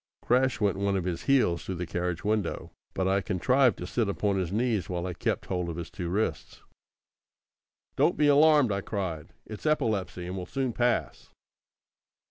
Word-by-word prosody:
Crash 130 +1 +2
went 100 -3 +1
one 100 0 0
of 95 - -2
his 85 -2 -4
heels 125 - +2
through 95 - -4
the 90 +1 -4
carriage 90 0 -3
window, 105 -1 -1 0.2
but 95 - 0
I 95 +1 +2
contrived 125 +7 +2
to 90 - -6
sit 110 +3 -1
upon 100 0 0
his 90 -2 -2
knees 110 -2 0
while 90 -1 -2
I 90 - -3
kept - - -2
hold 90 -2 -2
of 85 - -4
his 85 0 -6
two 90 -6 -5
wrists. 105 +5 -3 1.3
"Don't 175 - +3
be 150 - +3
alarmed!" 145 -3 +5
I 100 0 -1
cried, 95 -7 -4
"it's 110 +7 -6
epilepsy, 110 -11 0
and 90 +1 -5
will 90 -1 -5
soon 130 0 -2
pass!" 120 0 -1
100 Hz, 180 wpm, -28 LUFS, 90-120 Hz, 1.3 s, alarmed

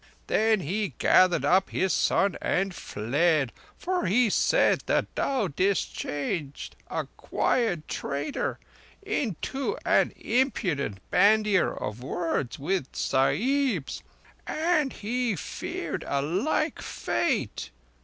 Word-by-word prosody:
Then 220 -2 +2
he 195 +6 -2
gathered 185 -3 +4
up 190 +1 +3
his 190 0 0
son 195 -3 +2
and 195 0 0
fled; 145 +2 0 0.2
for 365 0 -1
he 220 +3 +3
said - - +3
that - - 0
thou 260 -7 0
didst 190 +6 0
change 145 0 -4 0.2
a - - -2
quiet 195 -11 0
trader 140 +2 -3 0.5
into 280 - -2
an - - +3
impudent 180 - -1
bandier 210 -2 +4
of 105 +3 -5
words 140 -2 -2
with 165 -1 -2
the - - -12
Sahibs, 205 - +1 0.5
and 310 -3 +1
he 235 +1 -1
feared 150 - -5
a 140 - 0
like 220 - 0
fate. 230 - -2
195 Hz, 110 wpm, -27 LUFS, 150-245 Hz, 0.5 s, gathered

